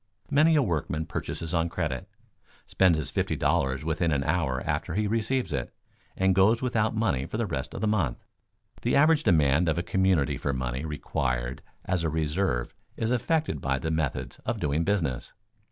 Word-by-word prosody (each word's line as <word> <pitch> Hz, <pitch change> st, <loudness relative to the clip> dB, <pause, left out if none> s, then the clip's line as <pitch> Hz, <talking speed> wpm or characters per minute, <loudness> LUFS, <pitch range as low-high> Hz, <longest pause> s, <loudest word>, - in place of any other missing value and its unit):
Many 155 Hz, +3 st, +5 dB
a 145 Hz, -, +4 dB
workman 80 Hz, -, -1 dB
purchases 80 Hz, +2 st, -4 dB
on 85 Hz, 0 st, +1 dB
credit, 75 Hz, -6 st, -3 dB, 0.6 s
spends 90 Hz, -4 st, +3 dB
his 80 Hz, -, -2 dB
fifty -, -, 0 dB
dollars 65 Hz, -5 st, 0 dB
within 80 Hz, +1 st, 0 dB
an 70 Hz, -2 st, +1 dB
hour 75 Hz, -5 st, 0 dB
after 80 Hz, -, -2 dB
he 105 Hz, +1 st, +1 dB
receives 115 Hz, -, 0 dB
it, 65 Hz, -3 st, -3 dB, 0.4 s
and 95 Hz, 0 st, +3 dB
goes 100 Hz, +5 st, +4 dB
without 115 Hz, -3 st, 0 dB
money 95 Hz, -, 0 dB
for -, -, -4 dB
the -, -, 0 dB
rest -, -, -4 dB
of -, -, -5 dB
the 110 Hz, -, +1 dB
month. 90 Hz, -, 0 dB, 0.6 s
The 120 Hz, -, +1 dB
average 155 Hz, +2 st, +5 dB
demand 80 Hz, -, +3 dB
of 80 Hz, -, 0 dB
a 85 Hz, -, 0 dB
community 95 Hz, -6 st, +1 dB
for 70 Hz, -, -1 dB
money 65 Hz, +2 st, -3 dB
required 60 Hz, -4 st, -2 dB, 0.2 s
as 90 Hz, -2 st, 0 dB
a 80 Hz, -, +1 dB
reserve 80 Hz, -4 st, -1 dB, 0.2 s
is 115 Hz, +1 st, -1 dB
affected 125 Hz, -, 0 dB
by 65 Hz, -1 st, 0 dB
the 80 Hz, +4 st, -3 dB
methods 65 Hz, -5 st, -2 dB
of -, -, -3 dB
doing 75 Hz, +2 st, 0 dB
business. 85 Hz, -10 st, -1 dB
80 Hz, 180 wpm, -27 LUFS, 70-105 Hz, 0.6 s, Many